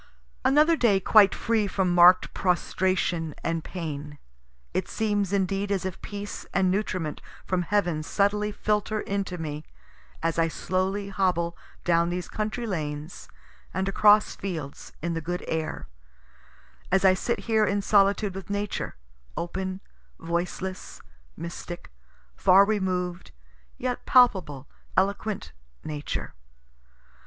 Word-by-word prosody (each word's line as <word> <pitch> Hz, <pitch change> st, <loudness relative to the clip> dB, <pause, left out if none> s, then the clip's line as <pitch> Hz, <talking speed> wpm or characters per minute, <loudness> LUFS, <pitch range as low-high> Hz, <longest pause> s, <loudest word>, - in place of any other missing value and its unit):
Another 300 Hz, +5 st, +5 dB
day 225 Hz, -9 st, +3 dB
quite 200 Hz, +1 st, +6 dB
free 225 Hz, -3 st, +1 dB
from 190 Hz, -2 st, 0 dB
mark'd 175 Hz, +1 st, +6 dB
prostration 180 Hz, -3 st, 0 dB
and 165 Hz, -1 st, -1 dB
pain. 150 Hz, -4 st, -6 dB, 0.6 s
It -, -, -1 dB
seems 205 Hz, -3 st, 0 dB
indeed 195 Hz, +1 st, 0 dB
as 190 Hz, -2 st, 0 dB
if 190 Hz, -, -5 dB
peace 205 Hz, 0 st, -6 dB
and 185 Hz, -1 st, +3 dB
nutriment 185 Hz, -6 st, -2 dB, 0.2 s
from 185 Hz, -1 st, 0 dB
heaven 175 Hz, -4 st, 0 dB
subtly 210 Hz, +5 st, +1 dB
filter 210 Hz, +1 st, -1 dB
into 195 Hz, -2 st, -3 dB
me 150 Hz, -2 st, -5 dB, 0.6 s
as 165 Hz, 0 st, 0 dB
I 165 Hz, -, +4 dB
slowly 190 Hz, +4 st, -2 dB
hobble 180 Hz, -3 st, 0 dB, 0.3 s
down 170 Hz, -1 st, +3 dB
these 180 Hz, 0 st, -3 dB
country 215 Hz, +3 st, -3 dB
lanes 155 Hz, -5 st, -5 dB, 0.5 s
and 190 Hz, +1 st, 0 dB
across 210 Hz, +2 st, +5 dB
fields, 160 Hz, -8 st, -6 dB
in 170 Hz, 0 st, -1 dB
the 165 Hz, -, -2 dB
good 175 Hz, +2 st, -4 dB
air 160 Hz, -1 st, -3 dB, 1.0 s
as 190 Hz, +1 st, +3 dB
I 190 Hz, -, +7 dB
sit 215 Hz, +5 st, -2 dB
here 220 Hz, -2 st, +2 dB
in 200 Hz, 0 st, 0 dB
solitude 200 Hz, 0 st, +3 dB
with 195 Hz, -1 st, -8 dB
Nature 205 Hz, 0 st, -3 dB, 0.4 s
open, 185 Hz, +2 st, -3 dB, 0.4 s
voiceless, 175 Hz, +2 st, -4 dB, 0.3 s
mystic, 170 Hz, -, -7 dB, 0.4 s
far 190 Hz, -, +6 dB
removed, 185 Hz, -4 st, -1 dB, 0.5 s
yet 250 Hz, -1 st, -3 dB
palpable, 180 Hz, -, +4 dB, 0.3 s
eloquent 200 Hz, +2 st, 0 dB, 0.3 s
Nature. 150 Hz, -1 st, -4 dB
190 Hz, 120 wpm, -26 LUFS, 170-205 Hz, 1.0 s, I